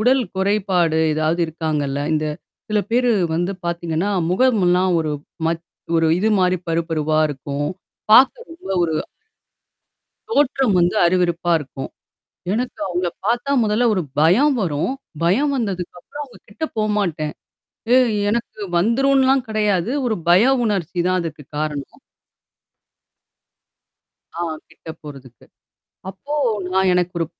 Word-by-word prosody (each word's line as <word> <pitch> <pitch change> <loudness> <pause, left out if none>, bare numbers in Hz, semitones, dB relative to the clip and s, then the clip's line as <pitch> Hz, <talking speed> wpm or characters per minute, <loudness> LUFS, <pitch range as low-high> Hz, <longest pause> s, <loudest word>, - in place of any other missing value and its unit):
உடல் 255 +4 +3
குறைபாடு 190 -4 +1 0.2
ஏதாவது 155 +2 0
இருக்காங்கல்ல? 150 -3 -2
இந்த 155 0 0 0.4
சில 210 - +2
பேரு 245 +1 +3 0.2
வந்து 175 +4 0
பாத்தீங்கன்னா, 170 +2 -1 0.2
முகம்ல்லாம் 185 -4 +3
ஒரு 155 -1 -2 0.3
மத் 165 0 -2 0.3
ஒரு 165 - +3
இது 215 +4 +1
மாரி 185 0 +3
பரு 165 0 +1
பருவா 155 -1 0
இருக்கும். 140 +1 -4 0.4
பாக்க 260 +4 +7 0.2
ரொம்ப 330 - -11
ஒரு 160 -2 0 1.4
தோற்றம் 270 - +2
வந்து 175 +2 +2
அருவெறுப்பா 175 -1 +1
இருக்கும். 135 -2 -7 0.6
எனக்கு 245 +3 -3
அவங்கள 180 -1 -1 0.2
பாத்தா, 240 +5 0
முதல்ல 215 +3 +2
ஒரு 190 - 0 0.2
பயம் 220 - +4
வரும். 160 - -1 0.3
பயம் 240 +13 +2
வந்ததுக்கப்புறம், 195 +3 -5
அவுங்க 255 - -17
கிட்ட 315 - -7
போமாட்டேன். 195 -8 -1 0.6
ஏ - - +7 0.3
எனக்கு 230 -1 -3 0.2
வந்துரும்ன்லாம் 265 +6 +3
கெடையாது. 210 -1 0
ஒரு 220 -3 0
பய 175 +3 +6 0.2
உணர்ச்சி 185 -5 -2
தான் 185 0 +2
அதுக்கு 160 -3 -6 0.2
காரணம். 150 -2 -4 2.4
ஆ, - - 0 0.3
கிட்ட - - -16
போறதுக்கு. 135 -4 -12 0.7
அப்போ 195 +10 -7 0.4
நான் 190 0 +3
எனக்கு 180 0 0
ஒரு 165 - +1
180 Hz, 120 wpm, -20 LUFS, 165-220 Hz, 2.4 s, பாக்க